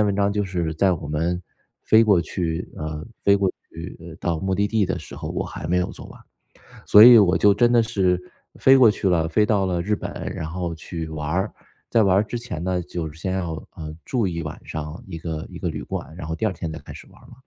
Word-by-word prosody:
篇 105 - +4
文 100 - +1
章 100 0 +2
就 105 0 0
是 85 -4 -2
在 95 +3 +3
我 80 -4 -5
们 85 +4 -1 0.4
飞 110 +1 +5
过 100 -5 +4
去 85 +1 -3
呃， 75 0 -5 0.2
飞 100 - +6
过 95 -2 +1 0.2
去 85 -1 -9
到 85 -2 -1
目 95 +3 -1
的 100 +2 +1
地 110 -3 +1
的 95 - -2
时 80 - -10
候， - - -6
我 - - -2
还 - - -7
没 90 +2 +1
有 90 - -1
做 - - -10
完。 - - -14 0.7
所 105 +1 +9
以 120 -1 +10
我 95 -3 +4
就 105 -1 +5
真 120 +3 +3
的 120 -1 +5
是 95 -5 +1 0.4
飞 135 - +6
过 125 -4 +7
去 105 -1 -1
了， 85 -3 +2
飞 105 +6 +3
到 105 -3 +2
了 90 -2 -1
日 105 +4 0
本， - - -6 0.2
然 - - -4
后 85 -1 -3
去 80 0 -6
玩 75 -1 -4
儿。 95 +6 -1 0.4
在 115 - +4
玩 95 -2 +4
儿 100 - +4
之 120 +3 -5
前 115 -9 -6
呢， 90 -1 0
就 80 -2 -5
先 85 +4 -4
要， 90 -3 -2 0.3
呃， 80 -1 -7
住 120 -6 0
1 85 -2 -3
晚 75 -1 -7
上 75 +2 -6
一 85 -3 -6
个 80 -1 -5
一 - - -8
个 - - -2
旅 - - -5
馆， - - -6
然 80 -4 -6
后 80 - -3
第 110 - -2
2 - - -1
天 85 -2 -5
再 80 - -6
开 70 - -12
始 - - -11
玩 - - -19
儿 - - -18
了。 - - -15
90 Hz, 270 characters per minute, -23 LUFS, 80-100 Hz, 0.7 s, 以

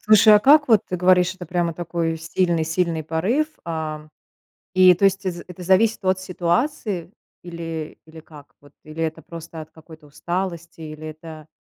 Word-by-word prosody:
Слушай, 215 0 +6
а - - +7
как 290 +4 +5
вот, 220 -4 +5
ты 180 - -2
говоришь, 180 +1 +3
это 180 -2 -10
прямо 175 -1 -1
такой 165 -1 -3
сильный-сильный 165 0 -1
порыв, 195 - 0 0.2
а, 155 -2 -5 0.7
и 185 -1 +7
то 195 - -1
есть, 195 0 +2
э, - - +1
з 175 0 -9
это 180 0 -10
зависит 190 +3 +2
от 185 0 +1
ситуации 185 - -2 0.3
или 165 -3 -7
или 160 0 -13
как 150 -2 -16
вот? 145 -1 -20
Или 155 +2 -6
это 160 -1 -3
просто 165 -1 -9
от 155 - -14
какой-то 160 -1 -16
усталости? 170 +2 -5
Или 155 0 -8
это 155 0 -11
170 Hz, 170 wpm, -22 LUFS, 160-185 Hz, 0.7 s, а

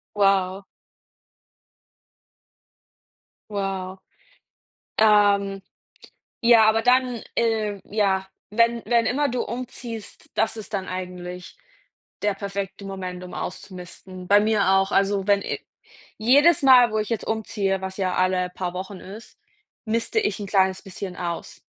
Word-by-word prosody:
Wow. 195 -1 +2 2.9
Wow, 195 -2 -3 1.0
ähm, 200 -2 +4 0.8
ja, 230 -2 +6
aber 225 +1 +2
dann, 250 -1 +2
äh, 215 -3 0
ja, 195 -2 0 0.2
wenn 230 +2 +2
wenn 235 0 +2
immer 285 +3 +1
du 250 -1 -1
umziehst, 235 -2 -7
das 220 0 +1
ist 220 -1 -8
dann 190 -2 -2
eigentlich 180 -1 -7 0.6
der 205 0 +1
perfekte 200 0 -5
Moment, 185 -2 -6
um 180 - -10
auszumisten. 185 0 -8
Bei 205 +1 +7
mir 210 -2 +2
auch. 195 +1 +3
Also, 195 0 +1
wenn 200 -1 +4
i - - -3 0.6
jedes 285 +9 +5
Mal, 250 -4 +7
wo 215 - +1
ich 215 - -3
jetzt 230 - -2
umziehe, 205 -3 -1
was 190 0 -6
ja 185 -2 -1
alle 185 0 +1
paar 180 -1 -3
Wochen 190 +1 -6
ist, 210 +5 -11 0.5
miste 230 - 0
ich 410 - -1
'n 205 - -5
kleines 190 -1 +2
bisschen 190 -1 -7
aus. 170 -2 -5
200 Hz, 125 wpm, -24 LUFS, 190-225 Hz, 2.9 s, Bei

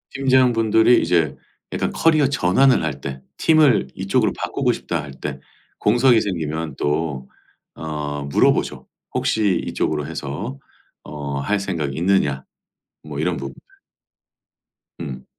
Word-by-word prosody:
팀장분들이 125 -4 +4
이제 85 -5 +1 0.4
약간 - - -1
커리어 155 -3 +3
전환을 130 - +3
할 70 -3 -3
때 70 -1 -6 0.2
'팀을 150 - +4
이쪽으로 - - +1
바꾸고 - - 0
싶다.' - - -3
할 75 - -9
때 - - -4 0.4
공석이 120 +2 +4
생기면 80 -5 -3
또 75 -3 -2 0.5
어 75 -2 -4
물어보죠. 70 - +1 0.3
"혹시 100 -5 +1
이쪽으로 75 -2 -1
해서 105 - -5 0.4
어 70 -2 -5
할 100 +9 0
생각이 85 -8 -3
있느냐?" 80 -7 +1 0.6
뭐 75 -2 -7
이런 85 +2 0
부분들. 70 -1 -7 1.4
음. 65 -2 -7
80 Hz, 255 characters per minute, -21 LUFS, 70-110 Hz, 1.4 s, 팀장분들이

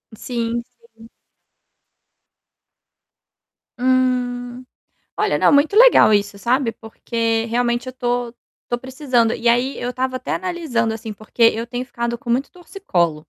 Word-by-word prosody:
Sim, 235 0 -3 0.3
sim. 225 +1 -16 2.7
Hum. 250 -1 0 0.5
Olha, - - +1
não, - - +4
muito 290 +7 +3
legal 470 - +7
isso, 200 0 0
sabe, 240 +2 0
porque 225 0 -2
realmente 240 +1 -1
eu 255 - -6
tô 245 -2 -2 0.4
tô 240 - 0
precisando. 255 -3 0
E 235 - -2
aí 245 +3 +2
eu 245 0 -3
estava 255 0 -2
até - - -4
analisando 320 -11 -1
assim, 220 -1 -7
porque 215 +3 -9
eu 230 0 +4
tenho 245 +1 -5
ficado 235 -1 -3
com 240 -1 -10
muito 255 +4 0
torcicolo. 325 - -2
245 Hz, 130 wpm, -20 LUFS, 230-255 Hz, 2.7 s, legal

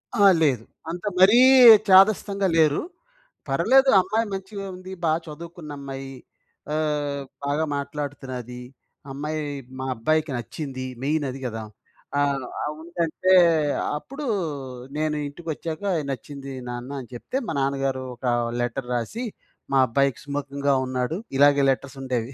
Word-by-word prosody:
ఆ! 205 -3 +5 0.2
లేదు. 130 -8 +2 0.3
అంత 175 +4 -5
మరీ 200 +6 +7 0.5
చాదస్తంగా 195 +1 +5
లేరు. 155 -2 +4 0.7
పర్లేదు 270 0 +4
అమ్మాయి 220 +4 0
మంచిగ 195 +1 -6 0.2
ఉంది. 185 +1 -10
బా 160 - +3
చదువుకున్న 165 0 -9
అమ్మాయి. 135 -1 -7 0.6
ఆహ్, 150 -2 -1 0.2
బాగా 145 +3 0
మాట్లాడుతున్నది. 135 -4 -6 0.5
అమ్మాయి 150 +3 -3 0.4
మా 130 - -3
అబ్బాయికి 155 +6 0
నచ్చింది. 130 +2 -6 0.2
మెయిన్ 150 +1 0
అది 130 +1 -7
గదా! 115 -2 -4 0.5
ఆ! - - +3 0.4
ఆ - - -1 0.2
ఉందంటే 170 +2 0 0.6
అప్పుడు 275 - -8 0.7
నేను 155 0 0
ఇంటికి 165 +4 -9
ఒచ్చాక 160 +4 -6 0.3
"నచ్చింది 140 +1 -6 0.2
నాన్న" 120 +2 -6
అని 125 - -13
చెప్తే 120 - -4
మా - - -2
నాన్నగారు 135 -1 -1
ఒక 120 - -10 0.4
లెటర్ 120 +1 -3
రాసి 125 - -3 0.5
"మా - - +4
అబ్బాయికి 135 +2 +1
సుముకంగా 140 0 -1
ఉన్నాడు." 130 +5 -2 0.2
ఇలాగే 145 0 +5
లెటర్స్ 135 0 -2
ఉండేవి. 125 -2 -2
145 Hz, 125 wpm, -24 LUFS, 135-165 Hz, 0.7 s, మరీ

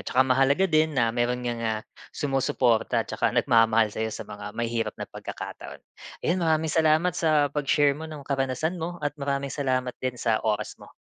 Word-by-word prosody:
tsaka 130 +1 +4
mahalaga 135 +7 +3
din 155 -4 +2
na 115 -2 +2
meron 125 +1 -1
ngang, 120 -1 -2
ah, 110 -1 -1 0.3
sumusuporta, 130 -4 +1
tsaka - - 0
nag-mamahal 115 -2 +3
sayo, 110 0 -2
sa - - -6
mga 105 +1 -9
mahihirap 115 -2 -2
na - - -5
pagkakataon. - - -8 0.4
'Yon, 180 +2 +1
maraming 160 -1 +1
salamat 160 +2 +3
sa 155 -4 +2
pag-share 145 0 +2
mo 160 +3 -7
ng 150 -3 -9
karanasan 140 +6 -1
mo, 175 +2 -4
at 145 - 0
maraming 140 0 -2
salamat 130 -3 -1
din 130 -1 -2
sa 115 -2 +1
oras 105 0 -2
mo. - - -13
135 Hz, 175 wpm, -26 LUFS, 115-155 Hz, 0.4 s, tsaka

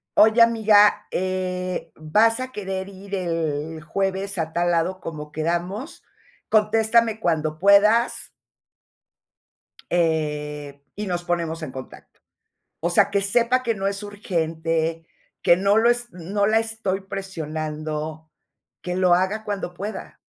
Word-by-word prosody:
"Oye, 220 +2 +6
amiga, 220 -3 +5
eh, 185 0 -2
vas 215 +10 +3
a 255 0 -5
querer 195 -3 -4
ir 195 +1 -7
el 160 -3 -2
jueves 195 +3 -2
a 160 -1 -2
tal 175 0 +1
lado 175 +3 0
como 150 -3 -7
quedamos, 175 - -3 0.5
contéstame 220 +1 +3
cuando 155 -5 0
puedas" 210 +4 +4 1.6
"eh, 150 -4 -1
y 210 0 -4
nos 175 -1 -2
ponemos 170 -2 -2
en 145 - -5
contacto". 130 -1 -11 0.6
O 170 +2 -1
sea, 175 - +4
que 200 -1 +2
sepa 240 +5 +2
que 230 -2 0
no 195 -1 -2
es 200 +1 -3
urgente, 165 -4 -2 0.3
que 170 - +5
no 200 +3 +3
lo 235 +2 +5
es 240 0 0
no 195 +4 -1
la 220 +1 +4
estoy 225 -4 -2
presionando, 155 -4 -5 0.5
que 180 0 -3
lo 185 -1 +4
haga 195 +4 0
cuando 200 -4 -4
pueda. 205 +4 -7
185 Hz, 130 wpm, -23 LUFS, 160-210 Hz, 1.6 s, Oye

